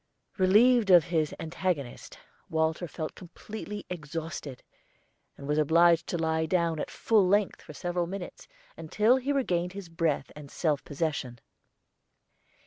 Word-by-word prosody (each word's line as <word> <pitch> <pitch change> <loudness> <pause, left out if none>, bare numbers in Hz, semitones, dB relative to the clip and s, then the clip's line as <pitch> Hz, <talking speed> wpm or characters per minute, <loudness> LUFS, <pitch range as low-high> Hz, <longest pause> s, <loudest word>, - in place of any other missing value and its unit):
Relieved 215 +4 +5
of 175 -3 +8
his 160 -4 -1
antagonist, 160 -5 -3 0.3
Walter 160 +2 0
felt 155 0 -5
completely 210 +3 -8
exhausted, 155 -4 -6 0.7
and 140 - -9
was 150 +1 +1
obliged 165 +2 +4
to 175 - -2
lie 160 -1 0
down 170 -2 +1
at - - -3
full 210 -5 +2
length 205 +1 +1
for - - -11
several 175 +1 -2
minutes 190 0 -7 0.3
until 215 +10 +2
he 265 +2 -2
regained 180 -10 0
his 195 -3 -8
breath 165 -4 -1
and 150 -2 -10
self 150 -2 -1
possession. 145 -5 -3
170 Hz, 135 wpm, -28 LUFS, 155-185 Hz, 0.7 s, of